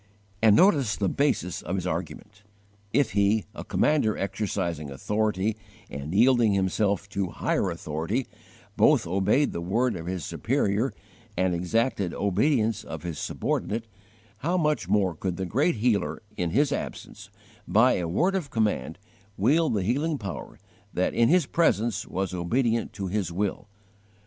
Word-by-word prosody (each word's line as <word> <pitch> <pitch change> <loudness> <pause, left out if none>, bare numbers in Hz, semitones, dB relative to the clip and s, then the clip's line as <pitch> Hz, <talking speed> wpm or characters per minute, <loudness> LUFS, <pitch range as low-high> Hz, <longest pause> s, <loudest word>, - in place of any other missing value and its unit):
And 110 -2 +6
notice 140 - +4
the 95 +4 0
basis 135 - 0
of 90 - -3
his 90 -2 -3
argument: 90 +4 -5 0.5
if 130 -2 +2
he, 100 +2 +2
a - - -7
commander 140 -9 +1
exercising 90 -6 -2
authority 105 +7 -1 0.4
and 70 +3 -5
yielding 115 +1 +4
himself 100 +1 0
to 100 -2 -1
higher 95 +2 -1
authority, 85 - -2 0.5
both - - +4
obeyed 100 - +2
the 85 - -4
word 115 +8 0
of 85 -1 -6
his 90 -3 -3
superior 105 +6 0 0.5
and 95 0 +2
exacted 95 +1 0
obedience 110 +3 +1
of 80 -1 -7
his 85 -4 -5
subordinate, 115 +2 -2 0.5
how 170 - 0
much 150 -3 0
more 95 -4 +2
could 90 +2 -4
the 95 - -2
Great 135 - +1
Healer, 110 -1 0
in 90 -4 -1
his 140 - +2
absence, - - -6 0.4
by 115 +8 +4
a 85 - -2
word 175 - +1
of 180 -7 -2
command, 105 - -1 0.4
wield 145 +6 +3
the 100 - 0
healing 145 - 0
Power 100 -7 -7 0.4
that 90 - +1
in 115 0 +3
His 180 +2 +4
presence 115 - +1
was 95 -1 -3
obedient 115 +6 0
to 100 -1 -5
His 95 -2 -2
will! 100 +3 -3
105 Hz, 150 wpm, -26 LUFS, 90-120 Hz, 0.5 s, And